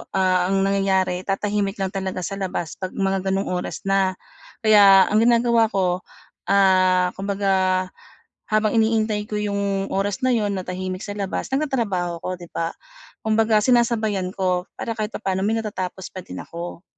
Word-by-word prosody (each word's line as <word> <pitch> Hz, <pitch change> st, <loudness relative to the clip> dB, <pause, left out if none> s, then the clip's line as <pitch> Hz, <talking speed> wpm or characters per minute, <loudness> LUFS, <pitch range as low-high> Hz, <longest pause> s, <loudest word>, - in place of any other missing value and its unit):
ah, 185 Hz, -1 st, +2 dB
ang 195 Hz, 0 st, +1 dB
nangyayari 190 Hz, -2 st, +1 dB
tatahimik 200 Hz, 0 st, -1 dB
lang 190 Hz, -, -2 dB
talaga 190 Hz, -2 st, -4 dB
sa 195 Hz, +2 st, -4 dB
labas 175 Hz, -4 st, -3 dB
'pag 185 Hz, -1 st, -5 dB
mga 195 Hz, -1 st, -1 dB
ganong 195 Hz, 0 st, -1 dB
oras 180 Hz, 0 st, -4 dB
na. 195 Hz, -1 st, +2 dB, 0.5 s
Kaya 200 Hz, -3 st, +7 dB
ang 210 Hz, -, +4 dB
ginagawa 235 Hz, -1 st, +4 dB
ko, 180 Hz, -2 st, +1 dB, 0.5 s
ah, 185 Hz, -2 st, +4 dB
kumbaga 190 Hz, -1 st, +1 dB, 0.7 s
habang 215 Hz, +1 st, +2 dB
iniintay 220 Hz, -1 st, +1 dB
ko 210 Hz, -, -2 dB
yung 200 Hz, -1 st, -1 dB
oras 200 Hz, +2 st, -1 dB
na 255 Hz, -, +3 dB
'yon 210 Hz, -3 st, 0 dB
na 190 Hz, -, -2 dB
tahimik 185 Hz, 0 st, -4 dB
sa 205 Hz, -, -5 dB
labas 195 Hz, -2 st, -3 dB
nagtatrabaho 220 Hz, -, -1 dB
ako -, -, -4 dB
'di 175 Hz, -, -10 dB
ba, 165 Hz, 0 st, -2 dB, 0.5 s
kumbaga 220 Hz, 0 st, +3 dB
sinasabayan 225 Hz, -6 st, +2 dB
ko 180 Hz, -2 st, 0 dB
para 230 Hz, -, -3 dB
kahit 215 Hz, -1 st, -1 dB
papaano 190 Hz, -3 st, -2 dB
may 220 Hz, +2 st, +1 dB
natatapos 190 Hz, -4 st, -4 dB
pa 185 Hz, -, -6 dB
din 90 Hz, -, -8 dB
ako. 170 Hz, +1 st, -8 dB
195 Hz, 160 wpm, -22 LUFS, 185-210 Hz, 0.7 s, Kaya